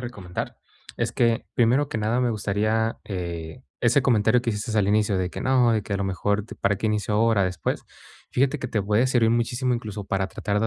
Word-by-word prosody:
recomendar 100 -8 -6 0.4
es - - -1
que 115 -1 +1
primero 125 +5 +3
que 115 - -3
nada, 110 +4 +1
me 125 -1 +2
gustaría, 110 +2 0
eh, 85 +2 -5 0.2
ese 125 +4 +3
comentario 120 -1 +3
que 120 - 0
hiciste 110 +1 -3
al 100 -2 +3
inicio, 105 -1 +2
de 90 - 0
que: - - -7
"No", 125 -3 +3
de 110 -2 +1
que: 100 - -6
"A - - +1
lo 100 - -2
mejor 100 +2 -1
te 110 - -10
¿Para 100 0 0
qué 110 - -2
inicio 105 0 0
ahora?, 110 -2 +3
después", 90 0 -2 0.5
fíjate 135 +3 +1
que 125 - -3
te 110 - 0
puede 105 +5 +2
servir 120 -3 +3
muchísimo 120 +2 0
incluso 105 -3 -5
para 95 0 -1
tratar 105 +1 -2
de 110 - +1
110 Hz, 220 wpm, -24 LUFS, 100-120 Hz, 0.5 s, primero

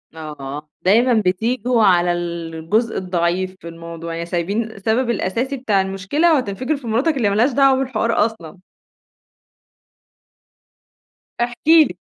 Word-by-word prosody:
آه، 150 -1 -8
دايمًا 235 +7 +4
بتيجوا 230 +5 +1
على 175 -2 +4
الجزء 170 +5 -2
الضعيف 185 0 -1
في 170 - -10
الموضوع، 165 0 -8
يعني 170 - -4
سايبين 175 +6 -1
السبب 220 +5 -1
الأساسي 235 +6 -1
بتاع 210 -6 +1
المشكلة، 195 - +1
وهتنفجر 255 +3 -1
في 250 -4 -10
مراتك 270 +7 +1
اللي 220 -6 +2
ما 200 - -1
لهاش 240 +6 +3
دعوة 270 0 +4
بالحوار 230 -4 +1
أصلًا. 185 -5 -8 2.8
احكِ 240 0 -2
لي. 320 -1 +5
200 Hz, 125 wpm, -19 LUFS, 175-245 Hz, 2.8 s, لي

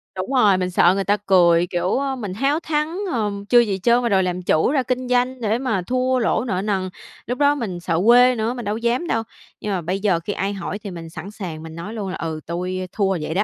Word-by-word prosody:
Đúng 190 +8 -4
rồi, 210 -7 +5
mình 180 0 -1
sợ 175 0 +5
người 195 - 0
ta 205 +2 +2
cười, 175 -4 +4
kiểu, 180 +1 -1
ơ, 275 -1 -1
mình 210 -7 -5
háo 275 +9 +1
thắng, 310 +1 -2 0.2
ờ, 215 -4 0 0.2
chưa 245 - +7
gì 205 -5 +1
trơn 240 +1 +4
mà 235 - +1
đòi 190 -2 +3
làm 180 0 -2
chủ 165 +3 +2
ra 275 -3 +1
kinh 255 +1 -2
doanh 250 +1 +1
để 220 0 +1
mà 225 -8 -1
thua 255 +5 0
lỗ 225 -1 +1
nợ 190 -6 -1
nần. 195 -3 -1 0.4
Lúc 245 +2 -2
đó 290 0 +3
mình 210 -10 -4
sợ 170 -1 -1
quê 245 +2 +6
nữa, 225 +1 -1
mình 245 -2 -6
đâu 205 +1 -1
có - - -3
dám 240 +8 0
đâu. 225 -5 0 0.4
Nhưng 210 - -3
mà 190 -2 -1
bây 185 +4 -2
giờ 195 -5 +1
khi 185 +5 -4
ai 195 +1 -2
hỏi 200 +1 -5
thì 205 -2 -7
mình 165 -2 -8
sẵn 190 +4 -8
sàng 175 -7 -7
mình 160 0 -9
nói 170 +6 -7
luôn 205 -4 -4
là 185 - -4
"Ừ, 160 -1 -4
tui 180 +2 -3
thua 195 -3 0
vậy 155 - -3
đó." 195 +4 +2
205 Hz, 270 wpm, -21 LUFS, 185-245 Hz, 0.4 s, chưa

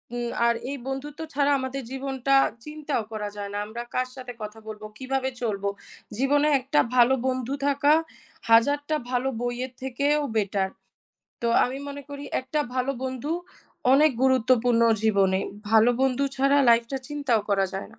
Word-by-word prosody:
উ - - -2 0.3
আর 235 - +4 0.2
এই 280 - -3
বন্ধুত্ব 270 +2 -5
ছাড়া 285 0 +2
আমাদের 260 +1 -4
জীবনটা 270 0 0 0.3
চিন্তাও 300 -5 -3
করা 210 -1 -4
যায় 200 -1 -5
না। - - -2
আমরা 230 +3 -6
কার 255 0 +1
সাথে 255 -2 -8
কথা 215 +1 -7
বলব, 215 0 -7 0.2
কিভাবে 265 0 -1
চলব? 210 -4 -2 0.5
জীবনে 285 +3 +3
একটা 275 +3 +1 0.2
ভালো 245 +1 +6
বন্ধু 255 0 -1
থাকা 285 +1 +4 0.6
হাজারটা 285 +7 +4 0.2
ভালো 255 +1 +1
বইয়ের 245 +1 -3
থেকেও 280 +3 +1 0.2
better। 200 -2 0 0.8
তো 235 - +1 0.2
আমি 260 +2 -4
মনে 285 0 -7
করি 285 0 -7 0.2
একটা 260 +4 -2
ভালো 260 +1 0
বন্ধু 260 +3 -3 0.6
অনেক 300 +3 +6
গুরুত্বপূর্ণ 250 -2 +3 0.2
জীবনে। 195 -3 +3 0.3
ভালো 225 +2 +6
বন্ধু 265 +1 +2
ছাড়া 275 +1 +3
life 230 0 +5
টা 270 - -1
চিন্তাও 280 -7 0
করা 195 -1 +3
যায় 195 - -5
না। 220 - -19
260 Hz, 155 wpm, -25 LUFS, 230-275 Hz, 0.8 s, ভালো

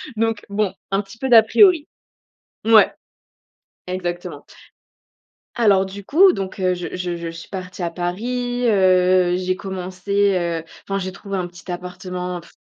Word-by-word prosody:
donc, 225 -1 -1
bon, 200 -1 0 0.2
un 195 +1 +2
petit 205 +3 -14
peu 265 - -3
d'à 230 -3 +8
priori. 340 - +4 0.8
Mouais, 225 -1 +6 1.0
exactement. 175 -1 -5 1.1
Alors, 200 -5 +4
du 195 +1 -8
coup, 360 - +5
donc 195 0 -5
heu, 185 0 +2
je 175 0 -5
je 180 -1 -3
je 170 0 -5
suis 165 0 -9
partie 185 -1 -6
à 170 - -1
Paris. 245 +8 -3
Heu, 185 -2 +4
j'ai 185 0 -1
commencé, 190 +1 -1
heu, 170 -2 -2 0.2
enfin 195 0 -1
j'ai 185 -1 -4
trouvé 195 0 -6
un 180 -1 -2
petit 175 +1 -12
appartement. 180 0 -5
Pff 170 - -19
185 Hz, 150 wpm, -21 LUFS, 180-210 Hz, 1.1 s, d'à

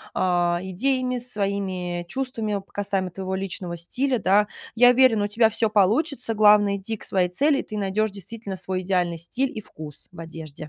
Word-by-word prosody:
а, 175 -1 +2
идеями, 250 +6 -1
своими 195 -6 -3
чувствами 225 -5 -2
касаемо 195 -3 -1
твоего 190 +1 -4
личного 180 -2 -4
стиля, 255 +10 -1
да. 200 +3 +3 0.3
Я 245 +2 +7
уверена, 245 -4 +5
у - - -1
тебя 220 +2 +3
всё 225 0 +1
получится. 225 - +1
Главное- 210 -1 +5
иди 215 +3 -5
к - - -14
своей 180 -2 +1
цели 280 - +2
и - - -3
ты 215 - -7
найдешь, 210 +2 0
действительно, 200 +1 -7
свой 185 0 -3
идеальный 180 -2 0
стиль 250 +11 -2
и 215 - -4
вкус 150 -6 -10
в 175 - -13
одежде. 160 -3 -9
200 Hz, 175 wpm, -24 LUFS, 180-225 Hz, 0.3 s, Я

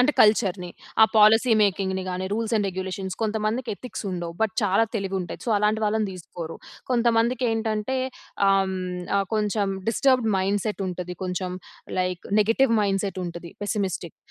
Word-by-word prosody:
అంటే 280 +4 +4
కల్చర్‌ని 195 -4 +3 0.3
ఆ - - +11
పాలిసీ 225 +3 +6
మేకింగ్‌ని 190 -1 0
గాని 185 +1 -3
రూల్స్ 225 +2 -1
అండ్ 205 -2 +1
రెగ్యులేషన్ 190 0 -4
కొంతమందికి 220 +3 -1
ఎథిక్స్ 250 0 -7
ఉండవు. 175 -2 -4
బట్ 220 -1 0
చాలా 200 +2 +3
తెలివి 195 -3 -2
ఉంటాయి. 175 - -6
సో, 235 - -1
అలాంటి 210 +1 +1
వాళ్ళని 215 0 +1
తీసుకోరు. 170 -2 -7 0.3
కొంతమందికి 235 +1 +2
ఏంటంటే 220 +2 -1 0.5
ఆహ్, 195 0 +5
హ్మ్, - - -3 0.4
ఆహ్, 195 0 +1
కొంచెం 210 -1 +1 0.2
డిస్టర్బ్డ్ 255 0 +3
మైండ్ 195 +1 +1
సెట్ 210 -2 -2
ఉంటది 180 0 -5
కొంచెం 180 0 -2 0.5
లైక్ 180 -1 -1 0.2
నెగెటివ్ 230 +4 +3
మైండ్ 195 -2 +1
సెట్ 195 -1 -3
ఉంటది. 170 0 -7
పెస్సిమిస్టిక్. 190 -5 -2
205 Hz, 155 wpm, -25 LUFS, 185-225 Hz, 0.5 s, ఆ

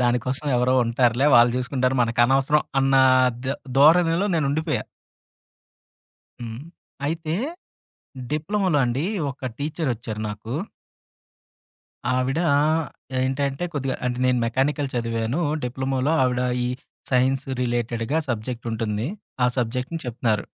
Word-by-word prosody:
దానికోసం 125 +4 0
ఎవరో 125 +1 +2
ఉంటారులే, 120 +3 +2
వాళ్ళు 120 +1 +6
చూసుకుంటారు 130 0 0
మనకనవసరం 135 +5 +3 0.2
అన్న 135 0 +3 0.5
ద - - -4 0.3
దోరణిలో 165 +5 +5
నేను 155 -4 +1
ఉండిపోయా. 155 +1 -1 1.6
హ్మ్. 115 +2 -6 0.4
అయితే. 160 0 -2 1.0
డిప్లొమాలో 180 +2 +1
అండి 125 +5 -1 0.3
ఒక 135 -1 -5
టీచరొచ్చారు 125 -8 -3
నాకు. 105 +3 -7 1.6
ఆవిడ 130 +3 0 0.8
ఏంటంటే 135 +4 -1
కొద్దిగా 135 -2 -2
అంటే 125 0 -2
నేను 125 -1 +2
మెకానికల్ 135 +4 0
చదివాను. 115 +4 -1 0.2
డిప్లొమాలో 130 +3 -1
ఆవిడ, 125 -1 +1 0.2
ఈ - - 0 0.4
సైన్స్ 130 +1 +2 0.2
రిలేటెడ్‌గా 120 +3 -1
సబ్జెక్టుంటుంది. 115 -1 -3 0.4
ఆ - - +5
సబ్జెక్ట్‌ని 125 +7 -2
చెప్తున్నారు. 110 -3 0
130 Hz, 100 wpm, -23 LUFS, 120-145 Hz, 1.6 s, వాళ్ళు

